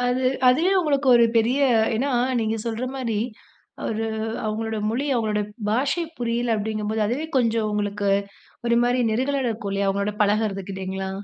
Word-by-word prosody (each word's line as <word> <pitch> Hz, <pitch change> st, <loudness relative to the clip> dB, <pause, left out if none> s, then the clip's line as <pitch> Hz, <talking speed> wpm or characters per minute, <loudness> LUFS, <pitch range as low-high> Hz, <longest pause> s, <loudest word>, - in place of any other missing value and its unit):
அது 250 Hz, +1 st, 0 dB, 0.3 s
அதுவே 320 Hz, +10 st, +4 dB
உங்களுக்கு 285 Hz, -4 st, +1 dB
ஒரு 235 Hz, -, +6 dB
பெரிய 230 Hz, +4 st, +3 dB, 0.4 s
ஏன்னா 270 Hz, +6 st, 0 dB, 0.3 s
நீங்க 220 Hz, 0 st, 0 dB
சொல்றமாரி 240 Hz, 0 st, -2 dB, 0.7 s
ஒரு 225 Hz, 0 st, -2 dB, 0.4 s
அவுங்களோட 220 Hz, +1 st, -2 dB
மொழி 265 Hz, +6 st, -1 dB
அவுங்களுடைய 215 Hz, -3 st, 0 dB, 0.2 s
பாஷை 270 Hz, +10 st, +1 dB
புரியல 235 Hz, -1 st, 0 dB
அப்பிடிங்கம்போது 215 Hz, 0 st, -1 dB
அதுவே 270 Hz, +8 st, -2 dB
கொஞ்சம் 230 Hz, -3 st, +2 dB
உங்களுக்கு 205 Hz, -1 st, -1 dB, 0.6 s
ஒருமாரி 240 Hz, +1 st, +3 dB
நெருடலா 265 Hz, +5 st, 0 dB
இருக்கும் 220 Hz, -3 st, -3 dB
இல்லயா! 200 Hz, 0 st, 0 dB
அவுங்களோட 200 Hz, +1 st, 0 dB
பழகுறதுக்கு 205 Hz, -2 st, 0 dB
இல்லலீங்களா? 190 Hz, 0 st, -4 dB
225 Hz, 135 wpm, -23 LUFS, 210-250 Hz, 0.7 s, ஒரு